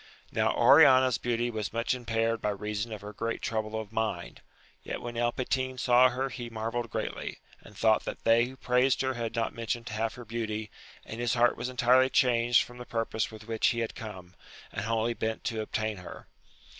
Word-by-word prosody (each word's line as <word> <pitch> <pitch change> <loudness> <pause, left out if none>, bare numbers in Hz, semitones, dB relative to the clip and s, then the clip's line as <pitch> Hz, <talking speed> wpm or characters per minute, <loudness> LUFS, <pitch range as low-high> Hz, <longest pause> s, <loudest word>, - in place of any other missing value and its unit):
Now - - +2
Oriana's 130 -3 +6
beauty 120 0 -1
was 110 -2 -3
much 115 +2 0
impaired 115 -2 -1
by 105 - 0
reason 105 +2 -3
of 110 - -6
her 105 +1 -8
great 115 +1 -3
trouble 110 -1 -2
of 110 -2 -7
mind, 110 -6 -3 0.4
yet - - -5
when 120 0 -6
El 120 0 +1
Patin 130 +1 -2
saw 125 0 +5
her 130 +2 -2
he 120 -2 -6
marvelled 115 +1 -3
greatly, - - -4 0.2
and 105 - -15
thought 110 -1 +3
that - - -6
they 115 +1 +5
who 130 +1 -9
praised 125 +1 +2
her 130 0 0
had 115 -1 -4
not 115 -1 -1
mentioned 115 +1 -3
half 110 +1 -2
her 120 - -10
beauty, 110 -2 -4 0.3
and 110 - -7
his 120 0 +1
heart 120 0 +4
was 125 - -4
entirely 130 +1 +4
changed 120 -2 +4
from 120 -1 -12
the 125 - -7
purpose 115 -2 -1
with 110 0 -12
which 115 -1 +1
he 120 -1 +1
had 115 - -3
come, 95 -5 -9 0.4
and - - -4
wholly 115 +1 0
bent 110 -1 -3
to 110 -1 -2
obtain 110 -1 -2
her. 90 - -10
115 Hz, 200 wpm, -29 LUFS, 110-120 Hz, 0.4 s, Oriana's